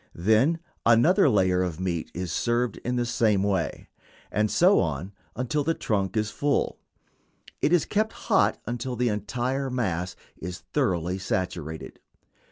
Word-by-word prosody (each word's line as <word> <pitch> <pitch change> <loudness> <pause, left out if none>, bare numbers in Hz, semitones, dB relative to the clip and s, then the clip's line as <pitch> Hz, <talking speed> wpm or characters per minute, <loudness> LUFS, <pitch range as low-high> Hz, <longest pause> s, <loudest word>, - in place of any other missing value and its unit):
Then 110 - +3 0.3
another 145 - +5
layer 95 -5 +3
of 90 -3 -2
meat 90 -3 -2
is 90 -1 -3
served 120 +6 0
in 125 +1 -3
the 120 -1 +1
same 110 -4 +2
way, 95 -5 -1 0.4
and 105 +1 +1
so 185 - +5
on 85 +5 -2 0.2
until 135 +4 -1
the 165 +3 0
trunk 100 -1 -1
is 105 0 0
full. 145 0 0 0.8
It 150 - +2
is 175 -3 +4
kept 215 +1 0
hot 195 -5 +2
until 120 +1 -3
the 120 0 +1
entire 125 +6 -2
mass 95 -8 -2 0.2
is 90 +2 -7
thoroughly 90 +1 0
saturated. 85 -4 -4
110 Hz, 145 wpm, -26 LUFS, 90-125 Hz, 0.8 s, another